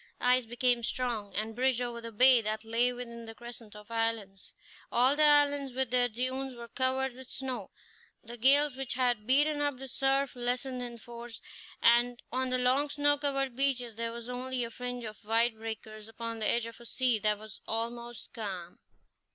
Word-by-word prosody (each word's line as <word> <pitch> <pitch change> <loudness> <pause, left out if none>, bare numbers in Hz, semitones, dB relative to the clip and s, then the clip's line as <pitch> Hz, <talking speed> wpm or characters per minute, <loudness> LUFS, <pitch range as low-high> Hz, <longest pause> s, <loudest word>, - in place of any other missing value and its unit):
The - - -3
ice 250 -1 +4
became 240 +1 +1
strong, 230 -4 -3
and 220 +1 -2
bridged 255 0 +2
over 240 -1 -3
the 230 0 -6
bay 250 +2 +7
that 215 +1 -3
lay 235 +2 +2
within 235 -1 -7
the 225 0 -8
crescent 235 -3 -9
of 210 +1 -13
islands. 225 -4 -2 0.4
All 255 +4 +5
the 305 - 0
islands, 285 -2 +4
with 260 -2 -1
their 245 -1 +3
dunes, 255 +3 -3
were 235 0 -9
covered 260 0 0
with 260 0 -12
snow; 265 -2 -4 0.5
the 235 +1 -8
gales 275 +3 +5
which 265 -2 -3
had 245 -4 +1
beaten 290 +3 +3
up 290 -2 0
the 270 +1 -7
surf 270 +1 +1
lessened 250 +1 -2
in 240 -1 -4
force; 235 0 -9 0.4
and 240 +1 +4
on 260 +1 0
the 255 - +2
long 260 +4 +2
snow 290 0 +2
covered 275 -3 -1
beaches 250 -4 0
there 230 +1 -3
was 235 0 -8
only 250 0 -3
a 230 - -5
fringe 245 +1 -5
of 215 0 -8
white 225 +2 +3
breakers 220 -1 -7
upon 230 0 -6
the 215 - +2
edge 235 -1 +2
of 230 0 -9
a 235 - -13
sea 250 -3 +2
that 210 0 +2
was 215 -1 -10
almost 235 +1 -4
calm. 185 -6 -6
245 Hz, 190 wpm, -30 LUFS, 230-260 Hz, 0.5 s, bay